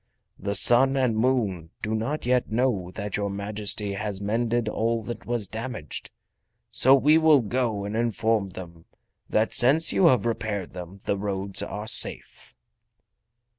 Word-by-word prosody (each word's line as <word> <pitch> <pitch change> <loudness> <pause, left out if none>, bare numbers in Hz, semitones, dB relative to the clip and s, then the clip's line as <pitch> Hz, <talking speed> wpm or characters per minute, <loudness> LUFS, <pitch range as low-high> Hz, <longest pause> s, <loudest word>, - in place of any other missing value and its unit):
The 100 +1 -1
Sun 130 +6 +6
and 125 -4 +1
Moon 110 -9 -1
do 110 - -2
not 120 +8 -3
yet 125 -2 0
know 110 -6 -1
that 105 -2 -4
your 100 -1 -2
Majesty 100 0 -4
has 100 -1 -4
mended 115 +3 -1
all 115 +1 -1
that 120 - -8
was 120 -4 -2
damaged, 110 - -7 0.6
so 130 +2 +6
we 150 +4 +4
will 155 -4 +5
go 115 -3 -2
and 105 +2 -5
inform 110 -3 0
them 85 -3 -11 0.4
that 110 +1 0
since 145 +7 +4
you 185 - +4
have 125 -8 +2
repaired 110 -5 -3
them 90 +2 -10
the 100 - -1
roads 100 -1 -2
are 105 +2 -6
safe." 110 - 0
110 Hz, 150 wpm, -25 LUFS, 100-120 Hz, 0.6 s, Sun